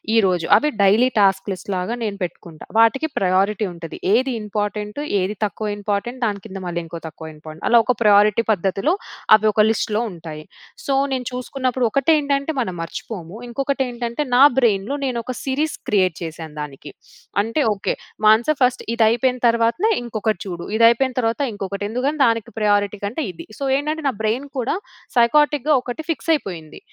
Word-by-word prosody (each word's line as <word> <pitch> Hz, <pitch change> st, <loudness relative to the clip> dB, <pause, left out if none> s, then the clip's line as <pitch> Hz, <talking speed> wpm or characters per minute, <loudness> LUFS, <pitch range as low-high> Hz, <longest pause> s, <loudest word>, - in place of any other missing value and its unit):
ఈరోజు 185 Hz, -6 st, +2 dB
అవి 300 Hz, -, +1 dB
daily 210 Hz, +6 st, +5 dB
task 195 Hz, -1 st, +3 dB
లిస్ట్‌లాగా 185 Hz, +3 st, -3 dB
నేను 205 Hz, -2 st, -3 dB
పెట్టుకుంటా. 170 Hz, -2 st, -8 dB
వాటికి 230 Hz, +7 st, +4 dB
ప్రయారిటీ 195 Hz, +3 st, +1 dB
ఉంటది. 165 Hz, -1 st, -8 dB, 0.2 s
ఏది 260 Hz, +4 st, +2 dB
ఇంపార్టెంట్ 210 Hz, +2 st, -3 dB, 0.2 s
ఏది 190 Hz, +3 st, -2 dB
తక్కువ 210 Hz, +1 st, -4 dB
ఇంపార్టెంట్ 205 Hz, +5 st, -3 dB
దాని 205 Hz, -2 st, -2 dB
కింద 195 Hz, -3 st, -7 dB
మళ్ళీ 175 Hz, -1 st, -3 dB
ఇంకో 165 Hz, +1 st, -7 dB
తక్కువ 160 Hz, 0 st, -9 dB
ఇంపార్టెంట్ 155 Hz, +1 st, -10 dB
అలా 235 Hz, -, +7 dB
ఒక 250 Hz, -, +2 dB
ప్రయారిటీ 210 Hz, +1 st, +5 dB
పద్ధతిలో 195 Hz, -, +1 dB, 0.4 s
అవి 215 Hz, 0 st, +2 dB
ఒక 215 Hz, 0 st, +4 dB
లిస్ట్‌లో 220 Hz, 0 st, 0 dB
ఉంటాయి. 160 Hz, -3 st, -9 dB, 0.4 s
సో, 275 Hz, -, 0 dB, 0.2 s
నేను 250 Hz, -2 st, -3 dB
చూసుకున్నప్పుడు 255 Hz, 0 st, -1 dB
ఒకటేంటంటే 280 Hz, +1 st, +2 dB
మనం 185 Hz, -7 st, -3 dB
మర్చిపోము 175 Hz, +2 st, -7 dB
ఇంకొకటి 275 Hz, +2 st, -1 dB
ఏంటంటే 240 Hz, +3 st, -3 dB
నా 260 Hz, -, +7 dB, 0.2 s
బ్రెయిన్‌లో 225 Hz, +2 st, +1 dB
నేను 255 Hz, -3 st, -2 dB
ఒక 255 Hz, -, -4 dB
సిరీస్ -, -, -11 dB
క్రియేట్సిరీస్ 295 Hz, +4 st, -1 dB
క్రియేట్ 185 Hz, -5 st, +2 dB
చేశాను 160 Hz, -1 st, -7 dB
దానికి. 145 Hz, 0 st, -8 dB, 0.5 s
అంటే 230 Hz, +8 st, -1 dB
ఓకే. 195 Hz, -, -2 dB, 0.3 s
మానస 220 Hz, +5 st, +5 dB
ఫస్ట్ 250 Hz, 0 st, +2 dB
ఇది 230 Hz, -, +3 dB
అయిపోయిన 250 Hz, +2 st, +1 dB
తర్వాతనే 230 Hz, -, +2 dB
ఇంకొకటి 220 Hz, -4 st, -2 dB
చూడు 175 Hz, -2 st, -6 dB
ఇది 230 Hz, -, +6 dB
అయిపోయిన 260 Hz, +2 st, 0 dB
తర్వాత 230 Hz, +4 st, -1 dB
ఇంకొకటి 200 Hz, 0 st, -5 dB
ఎందుకంటే 265 Hz, +7 st, -1 dB
దానికి 230 Hz, -2 st, 0 dB
ప్రయారిటీ 205 Hz, -1 st, +2 dB
కంటే 225 Hz, +10 st, -3 dB
ఇది. 170 Hz, -, -10 dB
సో, -, -, -5 dB
ఏంటంటే 305 Hz, +3 st, -2 dB
నా -, -, -3 dB
బ్రెయిన్ 225 Hz, +6 st, -1 dB
కూడా 250 Hz, +5 st, 0 dB, 0.4 s
సైక్ఆర్టిక్‌‌‌గా 295 Hz, +4 st, +4 dB
ఒకటి 245 Hz, +5 st, -5 dB
ఫిక్స్ 330 Hz, 0 st, -3 dB
అయిపోయింది. 170 Hz, -, -5 dB
220 Hz, 165 wpm, -21 LUFS, 195-250 Hz, 0.5 s, అలా